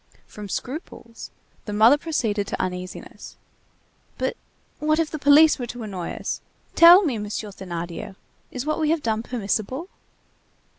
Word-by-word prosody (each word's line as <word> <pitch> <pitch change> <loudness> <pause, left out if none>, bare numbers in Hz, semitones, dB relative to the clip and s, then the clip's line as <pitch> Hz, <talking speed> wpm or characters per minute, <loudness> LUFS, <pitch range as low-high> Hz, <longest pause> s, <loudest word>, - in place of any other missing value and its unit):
From 210 -1 -10
scruples, 245 - -7 0.4
the 210 - -5
mother 220 +6 +6
proceeded 225 -10 -2
to - - -4
uneasiness: 180 0 -6 0.8
"But - - -2 0.4
what 310 +1 +1
if 325 -2 0
the 310 - -5
police 290 +2 +6
were 245 - -4
to 245 0 -7
annoy 190 -5 -5
us? - - -4 0.3
Tell 345 +4 +9
me, 265 - -1
Monsieur 210 +1 -5
Thénardier, 175 -2 -7 0.3
is 255 +1 -5
what 310 +1 -1
we 310 -1 +1
have 325 -1 0
done 220 -1 0
permissible?" 240 - -3
235 Hz, 145 wpm, -23 LUFS, 205-305 Hz, 0.8 s, Tell